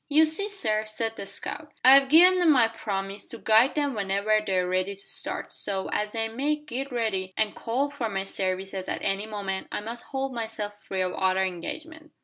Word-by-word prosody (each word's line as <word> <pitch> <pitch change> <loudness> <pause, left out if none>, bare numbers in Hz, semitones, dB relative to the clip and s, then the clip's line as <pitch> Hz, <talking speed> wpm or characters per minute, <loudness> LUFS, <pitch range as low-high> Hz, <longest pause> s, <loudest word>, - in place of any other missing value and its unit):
"You 310 +2 +6
see, 335 +7 +2
sir," 220 - 0
said 225 +1 -2
the 200 - -7
scout, 295 +9 -5
"I've 270 +1 +8
gi'n 360 +5 +7
them 345 -3 +5
my 250 -5 +5
promise 200 -3 -5
to 235 - -7
guide 225 +4 +4
them 290 -2 0
whenever 205 +1 +1
they're 185 -3 0
ready 185 +2 -1
to - - -18
start, - - -3
so, 195 -2 -3
as 210 0 -1
they 225 -1 -1
may 270 +7 -1
git 280 -2 -6
ready 195 -6 -2
and 215 -1 +1
call 270 +5 -1
for 250 -6 -3
my 195 -2 -2
services 190 0 -3
at - - -3
any 195 +2 -1
moment, 200 -3 -4
I - - -2
must 230 +3 -6
hold 270 -1 -3
myself 220 -3 -5
free 190 -1 -2
o' 185 - -2
other 190 0 +1
engagements. 310 - -6
220 Hz, 200 wpm, -26 LUFS, 195-275 Hz, -, I've